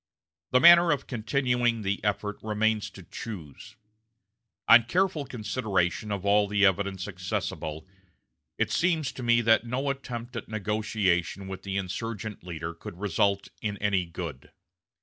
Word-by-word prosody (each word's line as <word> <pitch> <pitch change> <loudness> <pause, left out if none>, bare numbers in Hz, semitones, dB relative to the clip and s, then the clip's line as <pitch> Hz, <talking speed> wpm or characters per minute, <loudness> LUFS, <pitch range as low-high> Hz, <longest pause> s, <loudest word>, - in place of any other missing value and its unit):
The 125 - +4
manner 170 +3 +8
of 140 -2 -1
continuing 120 -1 0
the 100 +1 -2
effort 105 0 -1
remains 110 0 0
to 95 - -13
choose. 85 - -9 0.9
On 115 0 +8
careful 175 +2 +1
consideration 105 -5 -1
of 100 -1 -3
all 100 +1 +4
the 100 0 +3
evidence 95 -1 0
accessible, 80 -3 -4 0.7
it - - 0
seems 165 -5 +1
to - - -9
me 120 -1 +3
that 115 0 +3
no 135 +4 -1
attempt 125 -2 -7
at 115 - -6
negotiation 100 -3 -1
with 95 -1 -6
the 100 0 -3
insurgent 105 +2 -4
leader 85 -1 -5
could 85 +1 -10
result 100 0 +1
in 105 -2 -3
any 95 -3 0
good. 80 -5 -7
105 Hz, 140 wpm, -27 LUFS, 95-120 Hz, 0.9 s, manner